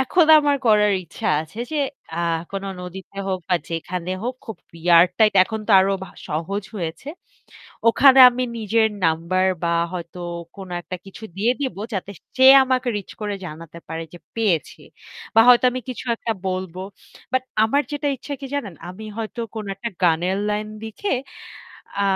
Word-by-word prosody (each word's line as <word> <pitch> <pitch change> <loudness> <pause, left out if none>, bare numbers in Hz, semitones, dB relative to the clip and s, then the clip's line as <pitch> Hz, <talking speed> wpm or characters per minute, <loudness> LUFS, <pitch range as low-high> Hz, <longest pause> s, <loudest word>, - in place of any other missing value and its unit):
এখন 320 +6 +3
আমার 290 -1 +2
করার 210 -1 +5
ইচ্ছা 165 - -7
আছে 160 +7 -10
যে - - -1 0.4
আ - - -4 0.3
কোন 195 0 -4 0.2
নদীতে 185 +2 -9
হোক 190 -1 -1
বা 180 - +3
যেখানে 170 +2 -4
হোক 250 +2 -2
খুব 225 - -6 0.2
রেয়ার 170 +1 +6
টাইপ 215 -2 +4
এখন 220 +2 -5
তো - - +1
আরো 195 +1 +2 0.4
সহজ 165 +7 -3
হয়েছে। 170 - -5 0.8
ওখানে 265 +3 +6
আমি 250 +1 -2
নিজের 220 0 +2 0.2
নাম্বার 170 +3 +1 0.2
বা 170 0 +1 0.2
হয়তো 175 0 -7 0.4
কোন 195 -1 -9
একটা 185 +1 -6
কিছু 195 +3 -11
দিয়ে 220 +5 +2
দিবো 260 -8 -3
যাতে 195 +1 -4 0.3
সে 260 - +4 0.2
আমাকে 255 -1 0
রিচ 200 - -10
করে 210 -1 -2
জানাতে 165 +1 -10
পারে 165 +1 -4
যে 175 - -11 0.2
পেয়েছি। 200 -9 0 0.5
বা 225 - +7
হয়তো 250 0 +7
আমি 255 +1 -4
কিছু 255 - -6
একটা 230 - -2
বলব। 185 -2 -3 0.6
বাট 260 0 +2 0.2
আমার 280 +6 +2
যেটা 290 0 -2
ইচ্ছা 285 +3 -6
কি 275 - -6
জানেন, 215 -11 -3
আমি 185 +5 -9
হয়তো 225 +1 -5
কোন 220 -1 -4
একটা 195 +5 -5
গানের 175 +2 +2
লাইন 210 0 -2
লিখে 225 - -4 0.9
আ - - +2
200 Hz, 165 wpm, -22 LUFS, 180-235 Hz, 0.9 s, বা